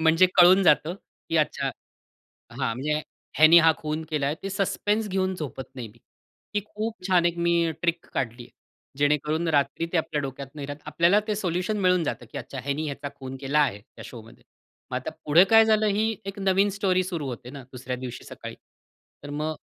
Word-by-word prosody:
म्हणजे 165 +3 +5
कळून 185 +2 +7
जातं, 160 0 +3 0.3
की 165 - 0
अच्छा 155 - +1 0.8
हां, - - -12 0.2
म्हणजे 150 +4 -1 0.4
ह्यानी 160 +2 +8
हा 160 -1 +6
खून 155 +1 -3
केलाय. 145 -1 0
ते 195 - -4
सस्पेन्स 205 +2 -1
घेऊन 190 0 0
झोपत 145 -5 -6
नाही 120 -4 -6
मी. 110 +3 -20 0.6
ती 205 - +2
खूप 215 -2 -5
छान 180 -2 +4
एक 175 0 -1
मी 170 0 +2
अं, 160 - -1
ट्रिक 170 0 -1
काढली. 120 -1 -3 0.5
जेणेकरून 150 +3 +1
रात्री 155 +2 +1
ते 180 - +1
आपल्या 150 -2 -1
डोक्यात 135 0 -6
नाही 145 -2 -6
राहत. 145 +1 -7
आपल्याला 170 +7 +3
ते 210 - +1
सोल्युशन 185 +2 -1
मिळून 180 -2 +3
जातं, 120 - -4
की - - -4
अच्छा 135 - -7
ह्यानी 140 +3 -2
ह्याचा 140 0 -5
खून 135 0 -7
केला 140 +2 +1
आहे 105 -8 0
त्या 105 - -15
शोमध्ये. 115 -2 -12 0.5
मग - - -4
आता - - -4
पुढे 160 +5 +6
काय 225 0 +8
झालं 215 -1 +3
ही 215 +2 +1
एक 195 +1 -6
नवीन 195 +1 +3
स्टोरी 185 -2 +2
सुरू 170 -6 -4
होते 125 0 -7
ना 140 -1 -9
दुसऱ्या 125 0 -5
दिवशी 125 -1 -7
सकाळी. - - -9 0.7
तर 145 - -8
मग 155 +2 -2
160 Hz, 190 wpm, -25 LUFS, 140-185 Hz, 0.8 s, ह्यानी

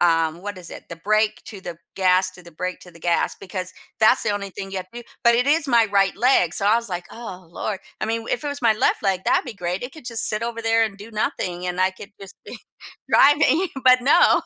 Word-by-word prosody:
um, 165 0 +2
what 205 -2 -6
is 180 - -8
it? - - -11
The 170 - -7
brake 215 +4 +1
to 200 -3 -8
the 175 -2 -7 0.2
gas, 185 0 +3
to 180 - -13
the 170 - -13
brake 180 +3 -4
to 180 - -13
the 165 - -16
gas, 170 0 +1
because 185 -1 -5 0.3
that's 220 - +5
the - - 0
only 200 -1 -3
thing 195 +1 -7
you 195 - -5
have 185 0 -8
to 240 - -7
do. - - -28 0.2
But 235 0 +6
it 250 +3 +2
is 300 0 +3
my 235 -3 +5
right 195 -1 +3
leg, 210 -8 +3
so 200 - -1
I 215 - +5
was 235 -2 -3
like, 175 -1 -4
"Oh 185 -7 -9
Lord," 195 +3 -4 0.2
I - - 0
mean, 230 +1 -1
w - - -1
if 245 - -8
it - - -1
was 285 -1 -5
my 230 - +5
left - - +1
leg, 190 -1 0
that'd 355 0 +2
be 245 - -6
great; 180 -1 -3
it 250 +2 -6
could 315 - -13
just 230 -2 0
sit 215 +1 -2
over 230 0 -3
there 225 0 +3
and 200 -2 -5
do 215 +3 -11
nothing, 180 -4 -2
and 180 +1 -2
I 185 0 +3
could 190 +1 -12
just 195 -1 -11
be - - -8 0.5
driving, 290 +5 +5 0.2
but 255 0 +7
no. 295 +6 +5
200 Hz, 270 wpm, -22 LUFS, 185-235 Hz, 0.5 s, but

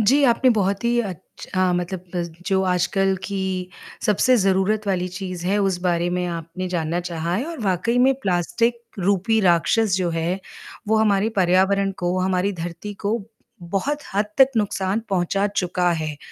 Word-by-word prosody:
जी, 260 +7 +4
आपने 255 +1 +4
बहुत 200 -1 0
ही 240 0 +2
अच्छा 185 -1 -3
अ, - - +1
मतलब 180 +1 -3 0.4
जो 190 -2 +2
आजकल 190 +1 +1
की 195 -1 -3 0.7
सबसे 250 +5 +4
ज़रूरत 195 +1 +1
वाली 185 -2 0
चीज़ 185 -1 -6
है, 200 +2 +2
उस 195 -3 +1
बारे 175 -1 +1
में 180 0 -1
आपने 170 +2 -5
जानना 170 -1 -1
चाहा 170 -1 -3
है 225 +8 -1
और 335 -5 -6
वाक़ई 195 +6 +1
में 260 +2 +5
प्लास्टिक 230 +6 0 0.2
रूपी 200 +4 +2
राक्षस 190 +3 +3
जो 180 -2 0
है, 165 +3 -1 0.5
वो 220 - +3
हमारे 210 -1 +3
पर्यावरण 190 +2 +3
को, 175 +1 0
हमारी 185 +1 +1
धरती 175 +4 -6
को 220 +3 +1 0.5
बहुत 285 +10 0 0.2
हद 205 +2 +2
तक 265 -1 +8
नुकसान 200 -1 0
पहुँचा 195 +2 +1
चुका 180 -3 0
है, 155 -2 -3
190 Hz, 160 wpm, -22 LUFS, 180-210 Hz, 0.7 s, तक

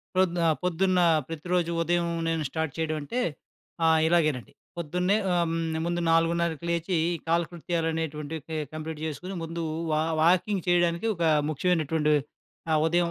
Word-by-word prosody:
ప్రొద్దు 180 -2 +2
ఆహ్, 160 - +4
పొద్దున్న 180 +1 +2 0.3
ప్రతిరోజు 170 +1 -1
ఉదయం 170 +1 +1 0.2
నేను 165 -1 0
స్టార్ట్ 160 -3 -2
చేయడం 160 -1 -1
అంటే, 240 - -2 0.7
ఆహ్, 160 -1 +5
ఇలాగేనండి. 155 - +1 0.3
పొద్దున్నే 180 +5 +1 0.2
ఆహ్, 170 -1 +3
హ్మ్, 165 -1 -1
ముందు 175 0 -1
4:30కి 165 0 +1
లేచి 170 +1 0 0.3
కాలకృత్యాలు 170 0 0
అనేటువంటివి 155 -1 -4
కె 160 - -3 0.2
కంప్లీట్ 155 0 -5
చేసుకొని 180 +5 -5
ముందు 165 0 -4 0.3
వా 155 0 +2 0.2
వాకింగ్ 185 +2 +2
చేయడానికి 175 +2 +2
ఒక 170 - -3 0.3
ముఖ్యమైనటువంటి 155 -1 +1 0.6
ఆహ్, 155 -1 +3
ఉదయం 170 0 +2
165 Hz, 135 wpm, -27 LUFS, 160-175 Hz, 0.7 s, ఆహ్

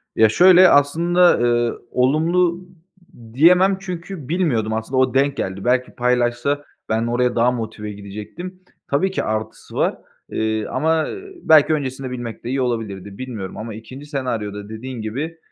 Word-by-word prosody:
Ya 110 -1 +5
şöyle, 180 - +7
aslında, 170 +5 +4
ııı, 120 -1 +1
olumlu 170 +7 +1 0.7
diyemem 180 +7 +5
çünkü 180 -5 -7
bilmiyordum 140 -11 0
aslında, 110 +4 -3
o 130 -1 +3
denk 140 +1 +2
geldi. 95 +2 -4
Belki 125 +1 +1
paylaşsa 125 +3 0 0.2
ben 110 +1 0
oraya 120 +1 +1
daha 120 +1 +3
motive 110 -3 -5
gidecektim. 105 - -8 0.3
Tabii 160 +7 +1
ki 190 - -2
artısı 110 0 -5
var, - - +1 0.4
ııı, 110 -1 -1
ama, 160 0 +1
ııı, 395 0 -8
belki 155 0 +6
öncesinde 130 -3 -3
bilmek 120 -2 -6
de 120 - -5
iyi 135 +1 0
olabilirdi, 100 -5 -3
bilmiyorum 115 -7 -6
ama 110 +1 -6
ikinci 130 +6 -10
senaryoda 110 -8 -4
dediğin 120 +2 -7
gibi, 140 +10 -4
125 Hz, 145 wpm, -20 LUFS, 110-160 Hz, 0.7 s, şöyle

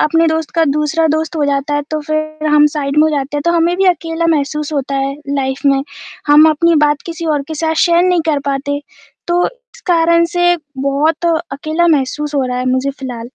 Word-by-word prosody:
अपने 330 +2 +2
दोस्त 320 -1 -2
का 330 -1 +3
दूसरा 300 +2 0
दोस्त 315 +1 -1
हो 295 - +1
जाता 280 +1 -1
है, 290 - 0
तो 310 - -2
फिर 310 0 -3
हम 300 0 +5
साइड 280 -1 -2
में - - +6
हो 315 - +3
जाते 290 -1 -2
हैं, 290 - -2
तो - - +4
हमें 340 +1 +1
भी 385 - +1
अकेला 335 -1 0
महसूस 295 +2 -3
होता 275 -1 -2
है 275 0 -1
लाइफ 270 -1 -2
में, 275 -1 +3 0.4
हम 300 +2 +6
अपनी 335 +2 +2
बात 295 -1 0
किसी 335 0 -5
और 280 - -2
के 315 - -4
साथ 320 +1 -1
शेयर 340 0 +3
नहीं 360 -2 +2
कर 300 -2 +1
पाते, 285 +1 -2 0.5
तो 350 0 +2
इस - - -20
कारण 335 -1 +3
से 350 0 +3 0.2
बहुत 295 +5 0 0.3
अकेला 310 +5 -1
महसूस 295 0 0
हो 270 - +1
रहा 250 0 -3
है 255 - -3
मुझे 260 +2 0
फिलहाल। 250 -4 -7
300 Hz, 215 wpm, -15 LUFS, 280-330 Hz, 0.5 s, में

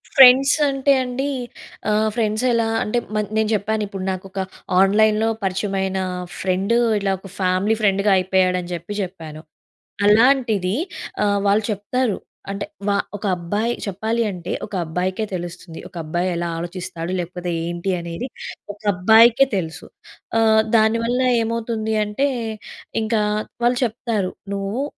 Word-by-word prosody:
Friends 265 0 +8
అంటే 275 0 +1
అండి, 255 +3 -2 0.6
ఆహ్, 215 +1 +2
ఫ్రెండ్స్ 220 -1 0
ఎలా 230 -1 +2 0.2
అంటే 210 +3 -1 0.2
మ - - +1 0.2
నేను 220 -1 +2
చెప్పాను 215 +1 -1
ఇప్పుడు. 195 -1 -6
నాకొక 190 +1 -6 0.4
ఆన్‌లైన్‌లో 215 +2 +4
పరిచయమైన 190 0 -1 0.4
ఫ్రెండ్ 190 +4 0 0.2
ఇట్ల 200 -1 -1
ఒక 195 - -11
ఫ్యామిలీ 185 +3 +2
ఫ్రెండ్‌గా 200 0 +3
అయిపోయాడని 185 -1 +1
చెప్పి 170 +4 -6
చెప్పాను. 165 -5 -7 0.7
అలాంటిది 220 -4 +4 0.5
ఆహ్, 200 -1 +2
వాళ్ళు 205 +2 +3
చెప్తారు 210 +2 -1 0.3
అంటే 200 - -4 0.2
వా 205 - +3 0.2
ఒక 205 - -6
అబ్బాయి 205 +7 -1
చెప్పాలి 220 +4 -1
అంటే 175 -1 -6
ఒక - - -15
అబ్బాయికే 185 +6 -2
తెలుస్తుంది. 175 -1 -6
ఒక 185 - -21
అబ్బాయి 175 +4 -1
ఎలా 170 0 -2
ఆలోచిస్తాడు? 175 0 -5
లేకపోతే 180 0 -4 0.2
ఏంటి? 175 +2 -2
అనేది 170 +8 -5 0.5
ఒక 205 - -21
అబ్బాయికే 225 +7 +6
తెలుసు. 160 -3 -5 0.5
ఆహ్, 220 -1 +5 0.2
దాని 220 +1 +3
వల్ల 245 +2 0 0.2
ఏమవుతుంది 225 -1 -2
అంటే 210 +7 0 0.7
ఇంకా 220 0 +1 0.4
వాళ్ళు 245 +1 +3
చెప్తారు. 220 -4 -2 0.2
నువ్వు 200 +7 -2
205 Hz, 130 wpm, -21 LUFS, 185-225 Hz, 0.7 s, ఫ్రెండ్స్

